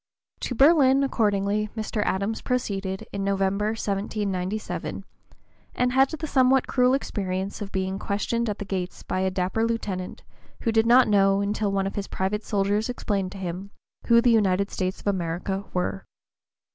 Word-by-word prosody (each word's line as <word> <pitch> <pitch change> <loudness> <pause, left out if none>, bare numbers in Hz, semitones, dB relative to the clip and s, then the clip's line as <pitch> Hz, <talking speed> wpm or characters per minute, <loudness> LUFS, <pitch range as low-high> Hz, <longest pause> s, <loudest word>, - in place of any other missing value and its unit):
To 250 - -3
Berlin, 275 -1 +5
accordingly, 210 -4 +1
Mr. 215 0 -2
Adams 200 +4 -1
proceeded 195 -6 -2
in 200 - -2
November, 195 +1 +1
1797, 200 -1 -3 0.7
and 250 0 +1
had 265 +1 +4
the 315 0 -5
somewhat 265 -2 +3
cruel 250 0 +3
experience 195 -6 -3
of 200 -1 -5
being 190 0 -2
"questioned 230 +3 -1
at 210 - -3
the 205 - -6
gates 185 -2 -4
by 185 - -2
a 190 0 +1
dapper 185 +4 -1
lieutenant, 210 -5 -3 0.4
who 230 - +1
did 225 0 +3
not 250 +2 +6
know, 195 -2 +4
until 205 0 -1
one 195 -1 0
of 195 - -3
his 200 -1 -4
private 205 +3 -2
soldiers 205 +2 0
explained 200 -6 -2
to - - -9
him, 185 +1 -5 0.4
who 235 0 +6
the 240 - +4
United 200 -3 +2
States 185 0 -2
of - - -21
America 190 +1 -2
were." 180 - -2
200 Hz, 160 wpm, -25 LUFS, 190-230 Hz, 0.7 s, not